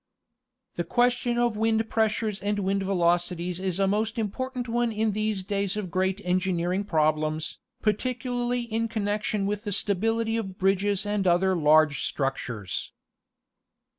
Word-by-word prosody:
The - - 0
question 245 0 +1
of 240 -2 +2
wind 225 +1 +1
pressures 220 -2 0
and 205 +1 0
wind 195 0 0
velocities 175 -1 0
is 190 -1 -2
a 195 - +4
most 215 +3 0
important 245 +4 -3
one 240 0 +1
in 220 0 0
these 215 -1 -1
days 200 +1 -1
of 190 -5 -4
great 190 +2 0
engineering 180 +1 0
problems, 155 -2 0 0.2
par 215 - +4
ticularly 245 +1 -2
in 230 0 -1
connection 210 -2 -1
with 205 +1 -2
the 205 - -3
stability 225 +3 0
of 195 -4 -4
bridges 195 +1 +1
and 205 -2 0
other 185 +2 +3
large 155 -2 +4
structures. 125 - -3
205 Hz, 140 wpm, -26 LUFS, 180-225 Hz, 0.2 s, a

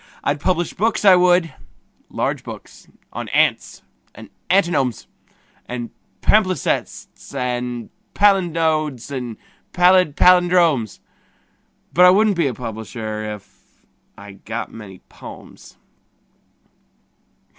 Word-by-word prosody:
I'd 145 +1 -1
publish 175 +1 -1
books, 220 +1 -1
I 190 -2 +8
would 180 -2 +3 0.6
large - - -3
books - - -11 0.3
on - - -6
ants - - 0 0.3
and - - -13 0.2
antinomes 170 - +1 0.6
And 120 -1 -6 0.3
palimpsests 185 -7 -1
and 125 -2 -4 0.2
palinodes 160 - +1
and 125 -5 -5 0.4
pallid 180 -4 +4
pallindromes: 175 - +3 0.9
But 180 - +6
I - - +8
wouldn't 205 +2 +3
be 170 -4 +1
a 130 - -2
publisher 110 -2 -6
if.... 100 - -22 0.3
I 100 0 -11
got 110 +4 -7
many 100 -5 -11
"pomes." - - -13
155 Hz, 100 wpm, -20 LUFS, 120-180 Hz, 0.9 s, I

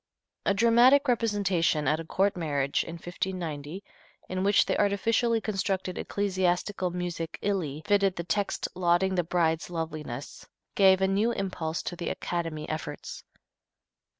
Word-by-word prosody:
A 200 - +3
dramatic 240 +6 +5
representation 200 - +1
at 155 - +2
a - - -4
court 195 +5 +1
marriage, 145 -5 0
in 165 - -7
1590, 175 -1 -5 0.5
in 185 0 -2
which 200 +1 +4
the - - 0
artificially 225 +3 +2
constructed 195 -3 -2
ecclesiastical 185 -1 0
music 175 -2 -4
illy 160 -7 -1
fitted 200 -2 +3
the 170 - -4
text 200 +4 -1
lauding 180 +1 +2
the 180 -1 +1
bride's 165 -1 0
loveliness, 155 -6 -6 0.3
gave 190 -1 +5
a 190 - +4
new 205 +5 +2
impulse 175 -6 -3
to 175 - -4
the 175 - -4
"Academy" 165 -3 -3
efforts. 155 -2 -6
180 Hz, 135 wpm, -28 LUFS, 165-200 Hz, 0.5 s, dramatic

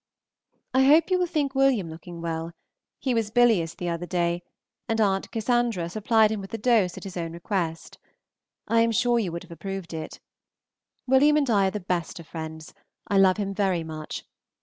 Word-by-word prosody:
I 260 +1 +5
hope 315 +6 +5
you 365 - +3
will 360 - +1
think 290 -4 -1
Wm. 265 -11 +2
looking 170 +1 -9
well; 165 0 -3 0.4
he 260 - -1
was 225 -3 0
bilious 220 -8 +3
the 175 - -3
other 170 +1 -3
day, 175 -1 0 0.5
and 225 0 0
At. 195 -3 +1
Cass. 225 -6 0
supplied 220 0 +3
him 215 -2 -2
with 195 - -9
a - - -3
dose 215 -6 +2
at - - -8
his 195 -3 -8
own 165 -2 -4
request. 170 -2 -3 0.7
I 230 0 +3
am 230 0 +3
sure 240 +1 +2
you 195 -6 -2
would 170 +1 -5
have - - -16
approved 195 0 -6
it. 160 -1 -6 0.9
Wm. 285 +4 +5
and 280 -4 +1
I 200 -3 +4
are - - +2
the 210 - -4
best 175 -2 -3
of 165 - -10
friends. 160 -1 -7 0.4
I 200 - +3
love 190 0 +5
him 200 -2 -2
very 190 -4 0
much. 155 -1 -7
195 Hz, 195 wpm, -26 LUFS, 170-230 Hz, 0.9 s, I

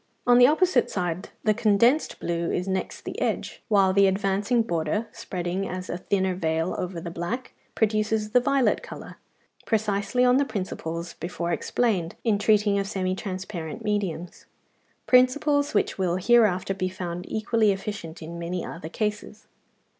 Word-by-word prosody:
On 245 0 +6
the 245 - +8
opposite 360 +6 +3
side 180 -1 -3
the 215 - +3
condensed 235 +6 +2
blue 170 0 -2
is 180 - -2
next 190 0 -3
the - - -6
edge, - - -2
while 195 -4 +4
the 200 0 +5
advancing 200 +4 +1
border, 170 +2 -1
spreading 180 +1 -4
as 185 0 -5
a 175 - -4
thinner 190 0 0
veil 165 -1 -1
over 180 -1 -4
the 170 +1 -6
black, 175 +10 -4 0.2
produces 215 0 +1
the 250 - +5
violet 265 +1 +2
colour, - - -10 0.5
precisely 215 +2 +1
on 250 +1 +5
the 280 - +3
principles 170 -7 -4
before 175 0 -4
explained 180 0 0
in 215 -4 +2
treating 205 -1 +3
of 195 - -2
semi 185 -2 -1
transparent 185 -4 -5
mediums, 190 -5 -3 0.6
principles 285 +2 +3
which 205 - +1
will 180 -2 +1
hereafter 195 -2 +3
be 185 -1 -2
found 180 -1 -6
equally 220 -1 +2
efficient 190 -4 -5
in 170 +2 -7
many 170 +1 -3
other 165 -1 -7
cases. 210 +2 -4
195 Hz, 155 wpm, -25 LUFS, 175-220 Hz, 0.6 s, the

